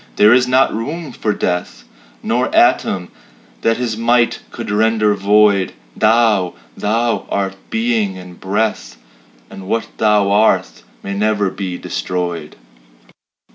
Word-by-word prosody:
There 105 +2 +6
is 125 0 +3
not 130 +1 +3
room 150 +7 -5
for 110 - -2
Death, 90 -3 -3 0.4
Nor - - 0
atom 90 -2 +2 0.5
that 115 0 +1
his 120 -3 -2
might 120 +1 +2
could - - -6
render 110 0 +2
void; 100 -1 +3 0.2
Thou 110 -5 +2 0.2
Thou 115 +2 -1
art 95 -1 -2
Being 110 -4 0
and 90 -1 -12
Breath, 100 - -2 0.5
And 95 -1 -10
what 115 +3 -1
Thou 105 -2 +2
art 100 - +2 0.2
may 100 - -4
never 105 -1 0
be 95 -3 -5
destroyed. 85 +4 -4
105 Hz, 125 wpm, -17 LUFS, 95-115 Hz, 0.5 s, There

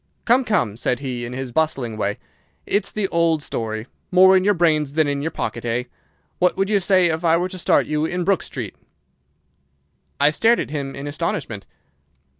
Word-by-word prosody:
"'Come, 245 +3 +4
come!' 165 - 0
said 125 +2 -1
he, 125 -3 -4
in 120 - -7
his 130 -1 -5
bustling 135 -6 -1
way. 105 -1 -2 0.5
'It's 205 - 0
the 210 -2 -1
old 165 -2 +1
story. 110 -3 -4 0.2
More 190 +1 +6
in 185 - +3
your 205 +1 +3
brains 155 -4 +1
than 155 -2 +3
in 140 0 -1
your 160 - -1
pocket, 120 - -4
eh? 120 +1 -1 0.6
What 180 0 +2
would 195 +2 0
you 205 - +4
say 185 -2 +3
if 160 +2 -3
I 165 0 +4
were 180 +2 -1
to 185 - -8
start - - +3
you 150 +1 -1
in 180 +2 -2
Brook 195 0 +2
Street?' - - -6 1.5
"I 145 +1 +4
stared 230 +9 +3
at - - -4
him 140 -3 -4
in 140 - -7
astonishment. 145 - -4
155 Hz, 195 wpm, -21 LUFS, 130-185 Hz, 1.5 s, More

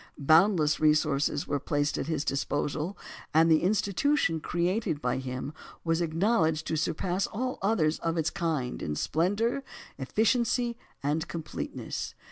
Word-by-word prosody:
Boundless 155 +1 +4
resources 150 -2 +2
were 145 - 0
placed 145 +1 0
at 135 - -3
his 155 -3 -1
disposal, 145 +5 -2 0.4
and 165 +1 +6
the 155 - +5
institution 200 - +1
created 175 0 -1
by 125 -3 -1
him 130 +2 -5 0.3
was 165 0 +1
acknowledged 160 -2 +1
to 160 - -1
surpass 180 +4 -1
all 255 +4 -3
others 185 -7 +1
of 165 0 -1
its 160 -1 0
kind 155 -7 -2
in 75 - -2
splendour, 205 - 0 0.4
efficiency, 235 - +1 0.3
and 155 +4 0
completeness. 160 -2 -5
160 Hz, 130 wpm, -28 LUFS, 150-195 Hz, 0.4 s, and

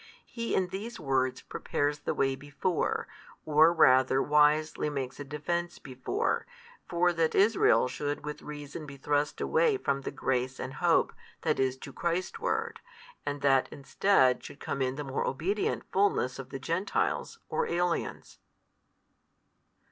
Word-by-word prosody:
He 230 -1 -3
in 185 -1 +1
these 205 +5 -6
words 130 -4 0
prepares 145 0 -2
the - - -3
way 135 -1 +1
before, 145 +5 -2 0.4
or 155 +2 +6
rather 130 -5 +5
wisely 150 +1 +3
makes 135 -2 -4
a - - -4
defence 170 +5 -3
before, 130 - -2 0.4
for 175 +1 +2
that 165 -1 +1
Israel 205 - +4
should 145 +3 -4
with 150 0 -5
reason 150 +1 -8
be 140 -1 -9
thrust 145 +2 0
away 475 -3 +2
from 140 - -1
the - - -4
grace 130 0 -1
and 130 +1 -5
hope - - +2 0.3
that - - +1
is 130 -1 +1
to 135 +1 -10
Christ 170 +2 -2
ward - - -2 0.5
and 145 0 -2
that 135 -2 +3
instead 135 -2 +2
should - - -10
come 135 - -3
in 130 0 0
the 150 - -4
more 135 -1 -2
obedient 185 +10 -1
fulness 185 -10 +1
of 135 -1 -7
the 135 - -5
Gentiles, 170 +8 -1
or - - -1
aliens. 175 0 -2
145 Hz, 150 wpm, -29 LUFS, 135-175 Hz, 0.5 s, or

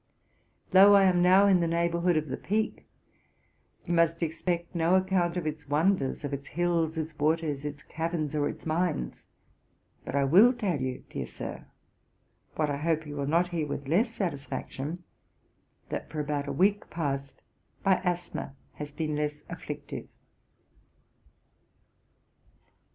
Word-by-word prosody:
Though 200 +2 +8
I 200 - +6
am 180 -2 +4
now 185 +3 +6
in 195 -3 +5
the 170 - +1
neighbourhood 170 +1 +1
of 155 0 -1
the 130 - -3
Peak, 215 +7 -2 1.0
you 175 - -1
must 165 0 +2
expect 170 +2 -2
no 170 +1 +3
account 185 -2 +1
of 175 - -2
its 150 -1 -4
wonders, 150 -2 +1
of 145 -1 -3
its 140 0 -5
hills, 170 -2 0
its 160 0 -4
waters, 155 -2 0
its 145 0 -6
caverns, 160 -2 -3
or 145 -1 +1
its - - -9
mines; 160 - -1 0.8
but - - -5
I 140 - +3
will 195 - +7
tell 195 - -1
you, 130 -1 -3
dear - - -4
Sir, - - -7 0.9
what 155 -2 0
I 140 - -1
hope 160 +1 0
you 145 -1 -7
will 140 -1 -2
not 170 +4 +2
hear 165 -4 -2
with 140 -1 -5
less 200 - +3
satisfaction, 165 -3 -4 0.9
that, - - -4
for 155 - -5
about 145 -1 -2
a - - -2
week 200 +3 +2
past, 140 -4 -3 0.4
my 190 -2 +4
asthma 175 -6 -3 0.2
has 145 -1 -7
been 155 0 -2
less 150 0 -2
afflictive.' - - -7
165 Hz, 150 wpm, -28 LUFS, 145-180 Hz, 1.0 s, Though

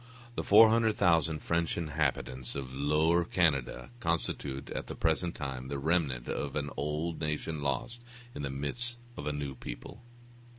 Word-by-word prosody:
The - - -2
400,000 100 -8 +5
French 85 0 0
inhabitants 70 -6 -1
of 65 -2 -5
Lower 75 +5 +3
Canada 70 - +1
constitute, 75 - -2
at - - -4
the - - -5
present 85 +1 +1
time, 65 -3 -4
the 70 +1 -3
remnant 70 -5 0
of 70 -2 -3
an 75 -1 -1
old 75 +4 -2
nation 75 0 -2
lost 70 - -2 0.3
in - - -5
the 70 - -2
midst 120 - -3 0.2
of 70 - -5
a - - +1
new 70 -2 -3
people. 85 - -8
75 Hz, 145 wpm, -31 LUFS, 70-85 Hz, 0.3 s, 400,000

